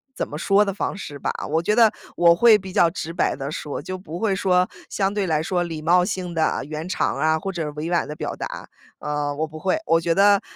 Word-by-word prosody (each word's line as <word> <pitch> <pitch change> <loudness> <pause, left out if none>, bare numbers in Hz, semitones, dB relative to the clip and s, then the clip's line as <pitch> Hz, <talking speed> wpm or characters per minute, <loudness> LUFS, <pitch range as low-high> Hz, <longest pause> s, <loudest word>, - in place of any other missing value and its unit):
怎 - - -2
么 150 - -8
说 200 +4 +3
的 195 - -2
方 200 - -3
式 145 -7 -8
吧。 - - -1 0.2
我 160 +2 +1
觉 210 +5 +1
得 225 -2 +6 0.3
我 170 0 +6
会 225 +2 +6
比 190 -2 -9
较 170 - +4
直 165 -1 -6
白 - - 0
地 135 +1 -5
说， 150 -2 -5
就 185 0 -6
不 170 -2 -7
会 205 -4 +1
说 180 -1 +2 0.2
相 195 0 0
对 205 -2 -1
来 155 -2 +1
说 175 0 0
礼 165 -2 -4
貌 180 +2 +4
性 180 -2 -3
的 160 -1 0
圆 155 +4 -6
场 - - 0
儿 - - -4
啊， 160 0 +3
或 195 +3 -4
者 165 -5 -3
委 155 +3 -4
婉 170 - +1
地 150 - -6
表 - - -4
达， - - -6 0.3
呃， 150 -1 -2
我 155 +2 -1
不 155 0 -10
会。 190 - +1
我 165 0 +3
觉 165 0 +1
得 200 0 +5
175 Hz, 275 characters per minute, -23 LUFS, 155-195 Hz, 0.3 s, 得